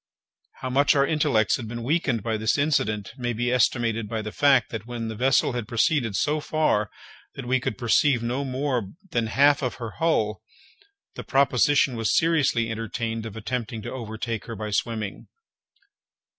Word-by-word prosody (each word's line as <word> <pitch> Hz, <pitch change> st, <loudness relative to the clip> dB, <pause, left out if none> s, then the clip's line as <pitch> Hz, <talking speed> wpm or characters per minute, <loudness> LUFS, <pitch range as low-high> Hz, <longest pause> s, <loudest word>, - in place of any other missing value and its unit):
How 130 Hz, -, -3 dB
much 140 Hz, +3 st, +4 dB
our 140 Hz, -1 st, +4 dB
intellects 145 Hz, -8 st, +2 dB
had 120 Hz, -, -7 dB
been 120 Hz, +1 st, -6 dB
weakened 135 Hz, -, 0 dB
by 115 Hz, -1 st, -1 dB
this 110 Hz, +4 st, +1 dB
incident 110 Hz, -9 st, 0 dB
may 120 Hz, -1 st, -1 dB
be 120 Hz, +2 st, -1 dB
estimated 115 Hz, -3 st, +1 dB
by 110 Hz, -1 st, -3 dB
the 110 Hz, -, -5 dB
fact, 135 Hz, -3 st, +3 dB
that 115 Hz, -1 st, -6 dB
when 120 Hz, -2 st, -4 dB
the 110 Hz, -, -5 dB
vessel 130 Hz, +4 st, +2 dB
had 120 Hz, -3 st, -4 dB
proceeded 120 Hz, -1 st, +1 dB
so 150 Hz, +8 st, +1 dB
far 150 Hz, -10 st, 0 dB, 0.5 s
that -, -, -7 dB
we 130 Hz, +1 st, +2 dB
could 130 Hz, -4 st, -3 dB
perceive 120 Hz, +1 st, +2 dB
no 125 Hz, +4 st, -1 dB
more 130 Hz, -5 st, -2 dB, 0.2 s
than 115 Hz, -1 st, 0 dB
the -, -, -5 dB
half 140 Hz, +4 st, +4 dB
of 125 Hz, -3 st, -2 dB
her 115 Hz, -3 st, -6 dB
hull, 110 Hz, -11 st, +1 dB, 0.7 s
the -, -, -7 dB
proposition 135 Hz, 0 st, +3 dB
was 115 Hz, -2 st, +1 dB
seriously 135 Hz, -8 st, +2 dB
entertained 115 Hz, 0 st, -3 dB
of 110 Hz, 0 st, -9 dB
attempting 110 Hz, 0 st, -4 dB
to -, -, -5 dB
overtake 115 Hz, -2 st, -5 dB
her 115 Hz, -, -6 dB
by 105 Hz, 0 st, -5 dB
swimming! 105 Hz, 0 st, -3 dB
120 Hz, 175 wpm, -25 LUFS, 110-135 Hz, 0.7 s, much